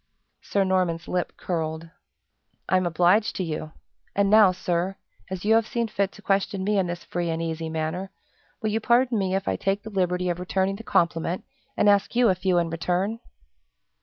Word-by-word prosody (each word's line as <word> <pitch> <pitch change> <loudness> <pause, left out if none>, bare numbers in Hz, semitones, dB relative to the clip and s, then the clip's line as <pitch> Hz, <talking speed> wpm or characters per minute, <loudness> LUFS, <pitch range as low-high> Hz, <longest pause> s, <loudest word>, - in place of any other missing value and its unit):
Sir 200 - 0
Norman's 180 -3 0
lip 180 -1 -2
curled. 160 -1 -3 0.8
"I'm 185 -1 +2
obliged 180 +6 +3
to 185 - -1
you! 155 -1 -4 0.4
And 200 0 +2
now, 210 -3 +7
sir, 180 +1 -1 0.3
as 190 0 -5
you 220 - +4
have 225 -1 +3
seen 235 -3 -1
fit 200 -2 0
to 210 - -15
question 195 -1 0
me 205 +1 +2
in 185 - +1
this 175 0 -5
free 175 -1 -3
and 165 0 -1
easy 165 -1 -3
manner, 160 +4 -3 0.5
will 215 - +1
you 220 - +1
pardon 235 0 +3
me 190 -1 0
if 195 - -2
I - - 0
take 195 +1 -1
the 220 - -8
liberty 180 -2 0
of 175 - -4
returning 190 +2 -1
the 225 - -9
compliment, 170 -2 0 0.3
and - - +3
ask 205 +2 +3
you 240 -2 +5
a - - +4
few 185 0 0
in 170 -1 +1
return?" 180 +6 -1
185 Hz, 190 wpm, -25 LUFS, 170-200 Hz, 0.8 s, now